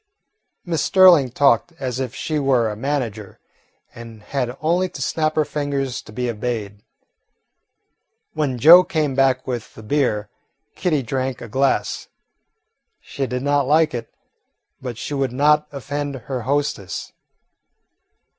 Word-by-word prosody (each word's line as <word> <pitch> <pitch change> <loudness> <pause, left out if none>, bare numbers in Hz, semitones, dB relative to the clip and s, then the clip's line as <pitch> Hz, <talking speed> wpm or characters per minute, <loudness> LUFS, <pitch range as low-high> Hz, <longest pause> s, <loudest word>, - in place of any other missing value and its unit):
Miss 165 -4 -1
Sterling 180 -8 +6
talked 140 +5 +2
as 130 -6 -4
if 130 -2 -4
she 155 -1 -2
were 125 -5 +2
a - - -6
manager 115 -5 -4 0.5
and 115 -2 -11
had 125 -1 -3
only 175 +4 +1
to - - -10
snap 155 +3 -1
her 155 - +2
fingers 140 -3 -3
to - - -14
be 125 +3 -3
obeyed. 110 -3 -4 1.5
When 145 -5 -1
Joe 165 +8 +9
came 155 -6 -1
back 130 -1 +2
with 120 -3 -5
the 110 - -11
beer, 110 -5 0 0.5
Kitty 155 -7 0
drank 130 +1 -3
a - - -8
glass. 135 +5 0 0.9
She 135 -1 -4
did 125 +1 -3
not 145 -1 +1
like 155 +1 +3
it, 120 - -5 0.7
but 125 -3 -6
she 145 - -5
would 135 -3 -1
not 150 +3 +3
offend 145 +1 -4
her 125 0 -5
hostess. 135 -7 -2
135 Hz, 135 wpm, -21 LUFS, 120-150 Hz, 1.5 s, Joe